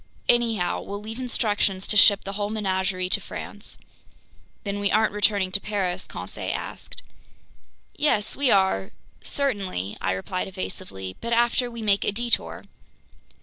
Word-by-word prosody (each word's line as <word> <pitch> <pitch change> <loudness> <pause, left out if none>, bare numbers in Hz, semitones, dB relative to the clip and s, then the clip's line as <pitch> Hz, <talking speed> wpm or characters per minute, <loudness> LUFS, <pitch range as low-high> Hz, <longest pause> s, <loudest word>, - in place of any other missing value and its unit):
Anyhow, 225 -7 +3
we'll 200 0 -5
leave 220 +3 -7
instructions 210 -6 0
to - - -1
ship 200 -1 +7
the 195 - -5
whole 205 0 -2
menagerie 190 -3 0
to - - +2
France." - - -7 0.9
"Then 205 0 -2
we 200 0 +2
aren't 215 -1 +3
returning 205 -2 +2
to 195 - +1
Paris?" 190 -3 -2
Conseil - - -4
asked. - - -6 0.9
"Yes, 220 -8 +2
we 280 -2 +2
are... 190 - +3 0.3
certainly... 195 - -1
," - - -27
I 95 - +1
replied 140 - -3
evasively, 180 - -5
"but 235 0 -1
after 240 +1 +3
we 235 -1 -6
make 200 -2 +3
a - - +2
detour." 235 +3 -1
205 Hz, 150 wpm, -25 LUFS, 185-225 Hz, 0.9 s, ship